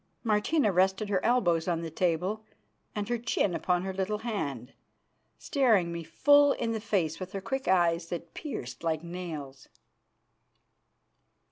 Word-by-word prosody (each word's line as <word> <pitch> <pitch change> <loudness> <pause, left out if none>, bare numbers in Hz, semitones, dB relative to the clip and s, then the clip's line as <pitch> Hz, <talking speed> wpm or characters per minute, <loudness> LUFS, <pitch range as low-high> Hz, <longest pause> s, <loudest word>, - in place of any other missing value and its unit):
Martina 215 +3 +2
rested 190 +3 +2
her 190 -2 0
elbows 175 -9 +2
on 170 -2 0
the 165 - -5
table 180 +6 0 0.5
and 205 -1 -2
her 240 0 -1
chin 225 -5 0
upon 180 +1 0
her 190 0 -3
little 195 +3 -1
hand, 150 - -4 0.6
staring 225 - +2
me 170 0 -4
full 285 - +5
in 230 -1 -2
the 220 -1 -2
face 170 -7 0
with 185 0 -7
her 195 - -2
quick 265 +7 -4
eyes 170 -2 +3
that 170 -1 -6
pierced 290 - -6
like 160 -1 -1
nails. 160 -6 -7
185 Hz, 145 wpm, -29 LUFS, 170-220 Hz, 0.6 s, full